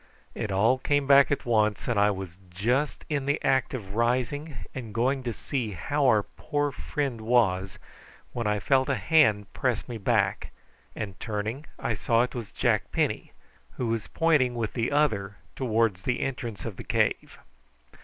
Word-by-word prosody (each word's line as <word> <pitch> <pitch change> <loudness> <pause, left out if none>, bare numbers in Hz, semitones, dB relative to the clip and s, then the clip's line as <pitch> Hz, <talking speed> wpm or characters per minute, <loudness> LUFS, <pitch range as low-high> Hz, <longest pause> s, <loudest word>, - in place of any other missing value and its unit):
It 110 - -4
all 110 +7 +3
came 145 +1 +1
back 140 0 +6
at 140 - -1
once, 110 -3 +1
and 120 -4 +1
I 105 +1 +5
was 95 -4 -5
just 120 +11 -1
in 140 -3 -2
the 145 - +1
act 130 0 +2
of 100 -6 -7
rising 125 +6 0 0.2
and 115 -5 -7
going 130 +4 +1
to 120 -2 -3
see 115 -1 -3
how 140 - 0
our 110 -4 +4
poor 145 +4 -2
friend 135 -3 -3
was, 95 -5 +2 0.6
when 120 -3 -2
I 105 0 +1
felt 130 +4 +2
a 140 - +2
hand 115 -11 +3
press 125 -5 -1
me 120 -3 -6
back, 100 - +1 0.5
and 100 -6 -6
turning 110 +6 -4
I 115 - -1
saw 115 +2 +2
it 125 - -4
was 115 -4 -6
Jack - - 0
Penny, - - -1 0.4
who 120 - -2
was 115 -2 -2
pointing 150 -7 +2
with 115 -3 -2
the 115 +1 -1
other 105 -10 +1 0.2
towards 115 -6 +1
the 125 +4 -1
entrance 120 -8 -4
of - - -5
the - - -7
cave. - - 0
120 Hz, 175 wpm, -27 LUFS, 105-135 Hz, 0.6 s, back